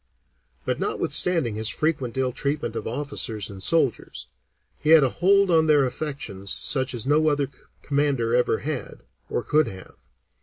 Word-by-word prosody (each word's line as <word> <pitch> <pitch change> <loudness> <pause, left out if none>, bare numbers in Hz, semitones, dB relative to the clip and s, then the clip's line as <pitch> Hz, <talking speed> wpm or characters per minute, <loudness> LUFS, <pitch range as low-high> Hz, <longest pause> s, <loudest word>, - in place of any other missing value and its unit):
But - - -1
notwithstanding 165 -11 +1
his 110 +1 0
frequent 140 -6 -2
ill 130 -1 0
treatment 140 -2 -3
of - - -4
officers 120 -5 -3
and 95 -1 -10
soldiers, 140 +1 0 0.5
he 150 - -2
had 160 -2 +7
a 135 - +2
hold 195 +5 +2
on 160 -1 +3
their 145 -3 +4
affections 125 -8 -4
such 130 -2 +2
as 115 - -3
no 150 +3 +2
other 145 -2 0 0.4
commander 140 -5 0
ever 125 -2 +2
had, 155 +2 -5 0.3
or - - -2
could 155 +1 +2
have. 95 -1 -10
140 Hz, 155 wpm, -24 LUFS, 120-155 Hz, 0.5 s, had